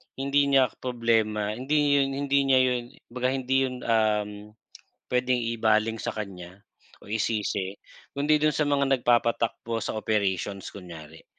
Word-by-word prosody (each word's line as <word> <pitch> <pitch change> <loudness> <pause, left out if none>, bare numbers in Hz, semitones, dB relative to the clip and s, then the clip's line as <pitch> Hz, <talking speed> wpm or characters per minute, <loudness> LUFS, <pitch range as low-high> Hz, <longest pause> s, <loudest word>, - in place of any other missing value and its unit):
hindi 140 +1 +1
niya 135 -3 +4
problema, 115 -4 0
hindi 145 +4 +2
yun 135 0 0
hindi 140 0 +1
niya 130 -1 +5
'yon, 125 -1 0 0.3
'baga 125 +1 -1
hindi 135 0 +1
'yon 125 - -6
uhm, 105 -2 0 0.5
puwedeng 125 0 +1 0.2
ibaling 110 0 +2
sa - - -4
kanya 95 -2 -8 0.4
o - - -15
isisi 105 -3 -1 0.4
kundi 150 +2 +2
dun 150 0 +2
sa 150 -1 0
mga 140 -1 +2
nagpapatakbo 115 -2 0
sa - - -3
operations 100 -2 -1
kunyari. 80 -4 -11
115 Hz, 135 wpm, -26 LUFS, 105-135 Hz, 0.5 s, niya